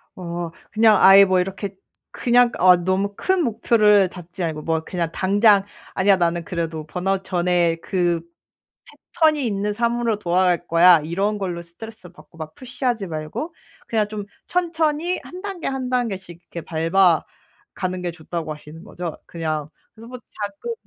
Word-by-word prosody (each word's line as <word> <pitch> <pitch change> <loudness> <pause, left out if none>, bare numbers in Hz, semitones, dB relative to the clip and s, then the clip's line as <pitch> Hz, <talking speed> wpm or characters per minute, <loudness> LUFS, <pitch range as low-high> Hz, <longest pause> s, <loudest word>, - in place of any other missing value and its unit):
어 170 -2 -5 0.2
그냥 220 0 +5
아예 195 +1 +9
뭐 185 -1 +2
이렇게 195 +2 -4 0.4
그냥 245 0 +3
어 180 0 +7
너무 185 +3 -1
큰 375 - +1
목표를 210 -5 +3
잡지 180 +1 -10
말고 155 -3 -3
뭐 160 -1 0
그냥 170 -1 -3
당장 200 +2 +3 0.3
'아니야. 195 +1 +4
나는 170 -1 0
그래도 165 -2 -4
번아웃 190 +3 -2
전의 175 -2 +1
그 175 -3 0 0.9
패턴이 310 -5 +3
있는 205 -1 -1
삶으로 235 0 0
돌아갈 180 -1 +1
거야.' 170 0 +6
이런 195 +6 -1
걸로 180 -3 -3
스트레스 185 +3 -12
받고 180 -1 -19
막 155 -1 -8
푸시 250 0 -9
하지 230 -6 0
말고 160 - -5 0.3
그냥 215 -2 0
좀 210 -1 -5 0.2
천천히 335 -1 0
1 360 +1 -10
단계, 390 -4 -5
1 265 -2 -3
단계씩 195 -9 -3
이렇게 170 - -5
밟아 165 +1 +2 0.5
가는 185 -1 -3
게 175 -1 -3
좋다고 165 -1 -5
하시는 150 +2 -13
거죠 180 -5 -6
그냥. 155 -3 -4 0.3
그래서 225 +1 -13
뭐 250 +1 -8
작은 295 - -6
190 Hz, 305 characters per minute, -22 LUFS, 170-225 Hz, 0.9 s, 아예